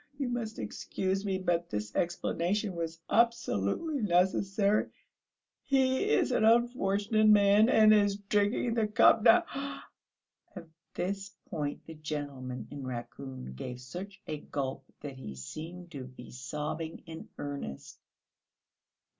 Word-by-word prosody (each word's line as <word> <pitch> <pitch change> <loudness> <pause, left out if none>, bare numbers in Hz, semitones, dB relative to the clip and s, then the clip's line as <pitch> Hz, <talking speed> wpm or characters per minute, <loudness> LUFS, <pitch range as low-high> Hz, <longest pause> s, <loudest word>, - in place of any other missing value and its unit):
you 275 -2 -1
must 235 -3 -3
excuse 190 +1 -2
me, 195 -2 0
but 175 -2 0
this 105 0 -4
explanation 180 +3 0
was 165 -1 -4
absolutely 235 - +1
necessary.... 195 +2 +2 0.7
He 265 +7 +2
is - - +3
an - - +2
unfortunate 220 -2 +3
man, 210 +1 +6
and 215 -3 +7
is 205 -1 +4
drinking 205 +3 +1
the 225 -2 +1
cup 210 +1 +5
now!..." 345 +10 +7 1.1
At 175 -3 -8 0.3
this 195 +1 -3 0.2
point 145 -2 -3
the 160 - -9
gentleman 140 -6 -5
in 140 -1 -6
raccoon 130 - -6
gave 125 - -6
such 180 +10 -8
a 155 -1 -4
gulp 135 -3 -4 0.2
that 140 -3 -7
he 70 - -7
seemed 165 - -8
to 135 -5 -6
be 125 -1 -12
sobbing 150 +5 -5
in 160 -1 -9
earnest. 140 - -6
180 Hz, 125 wpm, -31 LUFS, 140-215 Hz, 1.1 s, and